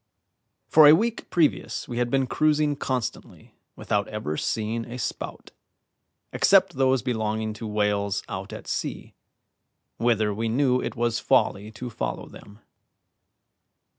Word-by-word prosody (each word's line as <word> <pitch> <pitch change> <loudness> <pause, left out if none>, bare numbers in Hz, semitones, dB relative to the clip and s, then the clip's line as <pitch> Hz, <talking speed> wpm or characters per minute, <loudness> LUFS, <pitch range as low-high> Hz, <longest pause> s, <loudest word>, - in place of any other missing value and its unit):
For 155 -1 +7
a 150 - +9
week 225 +6 -2
previous 165 -4 0
we 120 -2 -4
had 120 0 0
been 135 +1 +2
cruising 150 +2 +1
constantly 130 -4 -5 0.2
without 105 0 -1
ever 105 -8 -4
seeing 110 +6 -2
a 120 +1 -7
spout, 120 - -5 0.8
except - - +4
those 130 -2 +2
belonging 110 -3 -2
to 110 +1 -7
whales 105 -1 0
out - - -6
at - - -8
sea, - - -4 0.8
whither 110 -3 +1
we 115 +2 -2
knew 125 +1 +2
it - - -4
was 120 -1 0
folly 105 +2 +1
to 120 +2 -7
follow - - -4
them. 105 +2 -14
115 Hz, 135 wpm, -25 LUFS, 105-130 Hz, 0.8 s, a